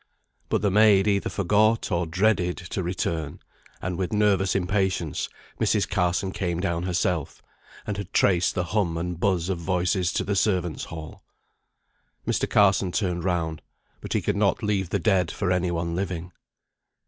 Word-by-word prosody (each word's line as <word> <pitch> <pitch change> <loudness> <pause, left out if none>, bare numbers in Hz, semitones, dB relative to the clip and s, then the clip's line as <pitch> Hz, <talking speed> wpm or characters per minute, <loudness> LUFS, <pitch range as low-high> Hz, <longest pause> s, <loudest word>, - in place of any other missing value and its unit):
But - - 0
the 100 - +2
maid 105 -1 +5
either 100 -1 +1
forgot, 105 +3 +2
or 85 -1 0
dreaded, 90 0 +1
to 90 +2 -4
return; 85 -3 -3 0.4
and 90 -1 -3
with 95 - -1
nervous 105 -3 +2
impatience 95 -4 0 0.3
Mrs. - - +2
Carson 90 +2 0
came 90 -3 -2
down 85 -3 -1
herself, 90 -3 -1 0.4
and 105 -1 -3
had 100 -2 -6
traced 90 -2 +3
the 90 - 0
hum 90 -2 0
and 85 0 -3
buzz 90 -3 +1
of 95 -3 -2
voices 90 +1 0
to - - 0
the 100 - -1
servants' 90 -5 0
hall. 80 -2 -9 1.0
Mr. - - 0
Carson 95 -2 +4
turned 85 0 -1
round. 80 -4 -1 0.4
But - - -5
he - - 0
could - - 0
not - - +1
leave 100 -4 0
the - - +1
dead 95 -6 +2
for 95 -3 -2
any 90 0 +1
one 85 0 -2
living. 90 -2 -3
90 Hz, 160 wpm, -25 LUFS, 85-100 Hz, 1.0 s, maid